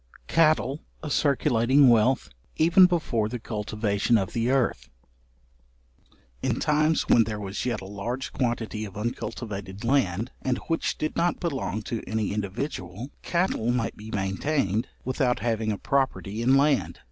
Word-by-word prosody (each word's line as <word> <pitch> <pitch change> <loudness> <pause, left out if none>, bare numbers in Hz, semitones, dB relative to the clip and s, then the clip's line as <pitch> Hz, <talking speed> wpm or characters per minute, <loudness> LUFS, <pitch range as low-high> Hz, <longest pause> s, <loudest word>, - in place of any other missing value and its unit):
Cattle 155 -3 +2 0.2
a 150 - -4
circulating 135 -2 +3
wealth, 120 - +3 0.3
even 175 +3 +6
before 125 -11 0
the 125 - -3
cultivation 105 0 0
of 95 -3 -2
the 115 +1 0
earth. 120 - 0 1.5
In - - 0
times 155 +1 +2
when 115 - +5
there 105 -1 -4
was 100 +4 -4
yet 120 -4 -1
a - - -8
large 110 +7 -5
quantity 115 -3 -2
of 100 -2 -8
uncultivated 105 -3 -5
land, 115 -4 +1
and 130 -1 0
which 165 0 -1
did 155 - -2
not 170 +1 +1
belong 130 - -2
to 115 +1 -4
any 110 -2 -1
individual, 105 - -4
cattle 170 -10 0
might 120 -2 0
be 105 +1 -10
maintained 105 +3 -1 0.2
without 130 -1 +1
having 110 -1 0
a 105 - -2
property 130 -6 -1
in 130 +3 +4
land. 140 0 +2
120 Hz, 145 wpm, -26 LUFS, 105-135 Hz, 1.5 s, even